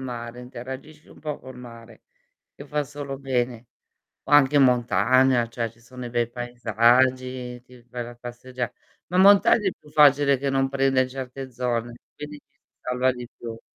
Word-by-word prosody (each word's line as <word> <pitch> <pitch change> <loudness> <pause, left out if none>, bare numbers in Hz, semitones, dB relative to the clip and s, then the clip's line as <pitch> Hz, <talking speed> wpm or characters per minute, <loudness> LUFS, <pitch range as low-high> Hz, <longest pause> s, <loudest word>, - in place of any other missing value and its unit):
mare, 120 -1 -6
interagisci 130 +5 -9
un - - -16
po' 150 -1 -5
col 130 -1 -12
mare, 115 -2 -13 0.5
che 140 - -11
fa 150 0 -1
solo 140 -1 -7
bene. 125 -3 -2 0.6
O - - -10
anche 145 0 +6
montagna, 125 0 +3
cioè, 115 -1 -3
ci 115 - -25
sono 125 +2 -13
dei 125 - -5
bei 120 0 -1
paesaggi, 125 +1 +1
ti 125 -1 -17
vai 120 -1 -4
la 120 - -9
passeggia 120 +1 -6 0.4
ma 180 - -2
in 185 - +6
montagna 200 +1 +6
è - - -2
più 150 - -19
facile 145 -2 +5
che 140 +1 -2
non 135 0 +1
prende 135 -1 +2
certe 130 0 -7
zone, 120 -1 -2 0.2
quindi 150 0 -8
ci - - -30 0.2
si - - -64
salva 125 +1 +1
di 125 -1 -9
più. 115 -1 -8
125 Hz, 175 wpm, -24 LUFS, 120-135 Hz, 0.6 s, anche